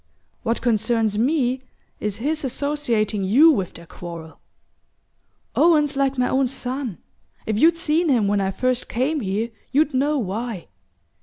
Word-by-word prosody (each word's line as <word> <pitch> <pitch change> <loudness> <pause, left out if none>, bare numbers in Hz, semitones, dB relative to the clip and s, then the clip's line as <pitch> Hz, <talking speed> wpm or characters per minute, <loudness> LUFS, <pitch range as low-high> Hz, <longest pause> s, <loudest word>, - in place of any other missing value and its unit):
What 230 0 -2
concerns 225 -2 +1
me 260 0 +1 0.4
is 210 -2 -2
his 300 +6 -1
associating 240 -7 -1
you 270 +13 +6
with 195 - -2
their 170 - -11
quarrel. 165 -1 -9 1.2
Owen's 300 -4 +4
like 275 -1 +1
my 250 0 +2
own 265 0 +2
son 255 - -4 0.5
if 215 -1 -1
you'd 330 +4 +5
seen 330 0 +1
him 235 -7 +3
when 205 0 +1
I 190 - 0
first 255 +5 -1
came 275 +6 0
here 215 +1 -2 0.2
you'd 295 +1 +2
know 290 +3 +1
why. 220 -2 -4
250 Hz, 145 wpm, -22 LUFS, 210-285 Hz, 1.2 s, you